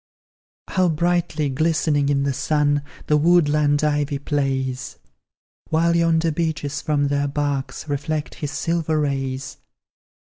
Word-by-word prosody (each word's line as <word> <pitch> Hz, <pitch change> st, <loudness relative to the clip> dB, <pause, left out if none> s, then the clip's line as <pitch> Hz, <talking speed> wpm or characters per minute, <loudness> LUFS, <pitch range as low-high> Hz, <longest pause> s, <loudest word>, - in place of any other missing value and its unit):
How 185 Hz, -2 st, +2 dB
brightly 170 Hz, -2 st, 0 dB
glistening 150 Hz, 0 st, +1 dB
in 140 Hz, -1 st, +2 dB
the 140 Hz, -1 st, 0 dB
sun 145 Hz, +1 st, +1 dB, 0.2 s
The 150 Hz, -, +3 dB
woodland 150 Hz, -3 st, +3 dB
ivy 145 Hz, -1 st, +1 dB
plays! 135 Hz, -2 st, -2 dB, 0.7 s
While 170 Hz, +1 st, +2 dB
yonder 165 Hz, -1 st, +2 dB
beeches 155 Hz, -3 st, -2 dB
from 145 Hz, -3 st, +1 dB
their 145 Hz, 0 st, 0 dB
barks 140 Hz, -1 st, -3 dB
Reflect 150 Hz, +1 st, -2 dB
his 150 Hz, -, -5 dB
silver 160 Hz, +2 st, -1 dB
rays. 135 Hz, -2 st, -2 dB
150 Hz, 115 wpm, -22 LUFS, 140-160 Hz, 0.7 s, The